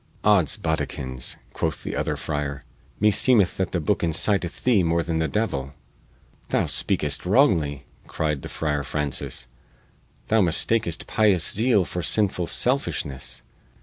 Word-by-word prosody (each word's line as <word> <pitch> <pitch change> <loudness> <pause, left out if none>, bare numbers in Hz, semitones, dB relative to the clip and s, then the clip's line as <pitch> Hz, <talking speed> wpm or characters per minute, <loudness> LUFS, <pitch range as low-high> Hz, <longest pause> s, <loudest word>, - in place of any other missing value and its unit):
"Odds 100 -8 +4
boddikins," 65 -5 -2 0.2
quoth - - -1
the - - -4
other - - -1
friar, 75 -2 -4 0.4
"me 105 +1 +4
seemeth 105 -4 +3
that 95 -2 -1
the 90 - 0
booke 95 +5 0
inciteth 85 +2 0
thee 120 -6 +4
more 85 0 +1
than 80 -1 -2
the 80 - +1
devil." 70 -11 -2 0.7
"Thou - - +1
speakest 75 -1 +1
wrongly," 85 - +2 0.2
cried 75 -3 -2
the - - -7
Friar 75 -2 -1
Francis. 75 -2 -2 0.8
"Thou 110 0 +3
mistakest 85 0 0
pious 100 -6 +2
zeal 110 -3 +2
for 90 - -4
sinful 95 0 0
selfishness. 70 - -2
85 Hz, 135 wpm, -24 LUFS, 75-105 Hz, 0.8 s, Odds